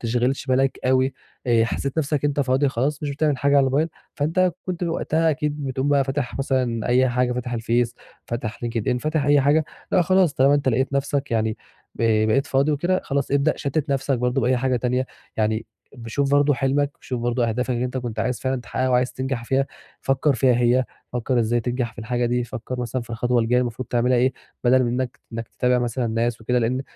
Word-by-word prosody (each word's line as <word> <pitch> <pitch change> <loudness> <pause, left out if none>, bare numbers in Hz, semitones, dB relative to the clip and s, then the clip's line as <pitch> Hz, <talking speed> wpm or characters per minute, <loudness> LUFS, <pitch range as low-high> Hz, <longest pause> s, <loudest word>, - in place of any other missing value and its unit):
تشغلش 125 +4 0
بالك 130 +1 +1
أوي، 130 +1 +2 0.3
آآ، 115 -2 +4
حسّيت 140 +5 -3
نَفْسك 145 -1 0
إن 145 - +3
أنت 145 - -1
فاضي 135 +1 +2
خلاص 140 +4 -1
مش 145 - -2
بتعمل 145 -1 0
حاجة 140 +1 +2
على - - +7
الموبايل، 145 +5 +1 0.3
فأنت 170 +5 +1
كنت 180 -1 -3
وقتها 165 -1 +1
أكيد 150 0 -2
بتقوم 130 +1 -1
بقى 140 -1 +3
فاتح 135 -1 -3
مثلًا 130 -4 0
أي 130 +1 +4
حاجة 125 0 +1
فاتح 125 0 -4
الفيس، 120 +1 0 0.3
فاتح 115 -2 -4
LinkedIn، 120 +1 -1
فاتح 155 0 -1
أي 145 -1 +5
حاجة، 150 +3 +3 0.3
لأ 180 - +5
خلاص 185 -2 +3
طالما 135 +2 +4
أنت 140 -2 +1
لقيت 130 +3 +1
نَفْسك 140 0 -1
يعني 110 -1 0 0.4
ب 110 -1 +2
بقيت 125 +6 +2
فاضي 140 +3 +2
وكده، 175 +6 +1
خلاص 140 -1 -1
ابدأ 140 +2 +3
شتِّت 140 +1 -2
نَفْسك 135 -1 0
برضه 125 +2 +1
بأي 125 +1 +2
حاجة 130 0 +1
تانية. 125 +2 0 0.3
يعني 110 +1 0 0.3
ابقي 115 -2 -9
شوف 140 +3 0
برضه 145 0 +4
حلمك، 140 +2 +1
شوف 125 -2 -4
برضه 120 0 0
أهدافك 125 +3 -1
اللي 120 0 0
أنت 125 +1 -3
كنت 120 -3 -4
عايز 125 +2 -1
فعلًا 130 -1 -1
تحقّقها 130 +2 -2
وعايز 125 0 +2
تنجح 130 -2 -3
فيها 135 +2 +1 0.3
فكّر 135 +1 +1
فيها 130 -1 +3
هي، 125 +1 +3 0.3
فكّر 125 +1 0
إزاي 120 +1 +1
تنجح 120 0 -2
في 120 - -24
الحاجة 120 +2 -1
دي، 125 0 0
فكّر 125 0 -6
مثلًا 120 +1 -2
في 115 - -14
الخطوة 120 +1 +1
الجاية 120 +2 +2
المفروض 125 +1 -4
تعملها 125 +1 +2
إيه 130 +2 +3 0.3
بَدَل 130 +1 +5
من - - 0
إنّك 125 +1 -3
إنّك 115 0 -5
تتابع 125 0 +1
مثلًا 120 0 -1
ناس 115 +1 -1
وكده 125 +3 +1
لإن 125 +3 0
130 Hz, 210 wpm, -23 LUFS, 120-140 Hz, 0.4 s, على